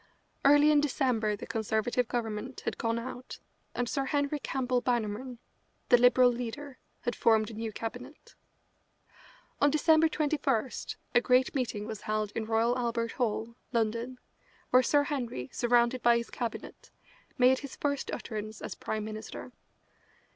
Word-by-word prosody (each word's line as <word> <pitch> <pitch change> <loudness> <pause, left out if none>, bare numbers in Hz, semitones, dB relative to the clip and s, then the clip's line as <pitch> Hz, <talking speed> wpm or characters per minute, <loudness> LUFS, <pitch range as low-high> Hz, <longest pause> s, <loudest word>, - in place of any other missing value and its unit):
Early 290 +2 +6
in 295 -1 +5
December 250 -7 +1
the - - -8
Conservative 220 +2 -1
Government 230 +1 -4
had - - -4
gone 230 0 0
out, 250 +1 -7 0.4
and 245 - -1
Sir 275 +3 -1
Henry 285 +1 0
Campbell 255 -3 -1
Bannerman, 240 +1 -2 0.5
the 245 - +8
Liberal 245 0 +6
leader, 250 +3 -6 0.2
had 240 - -2
formed 220 -1 +3
a - - -9
new 220 0 -4
Cabinet. 245 +7 -8 1.3
On 285 - +6
December 315 +2 +4
21 285 -6 0 0.4
a 240 - +5
great 250 +1 +3
meeting 230 -6 -2
was 220 -2 -6
held 215 -1 -2
in 220 - -3
Royal 225 +2 +2
Albert 230 -1 -1
Hall, 230 -1 -2 0.2
London, 230 +2 -1 0.5
where 255 - +7
Sir 290 +3 +3
Henry, 245 - -4
surrounded 240 +1 +2
by 235 0 +5
his 235 -1 -5
cabinet, 235 -2 -6 0.5
made 255 0 +5
his 280 -2 -8
first 285 -1 -2
utterance 215 -1 -5
as - - -5
Prime 215 -1 -4
Minister. 215 +3 -7
245 Hz, 145 wpm, -30 LUFS, 225-265 Hz, 1.3 s, the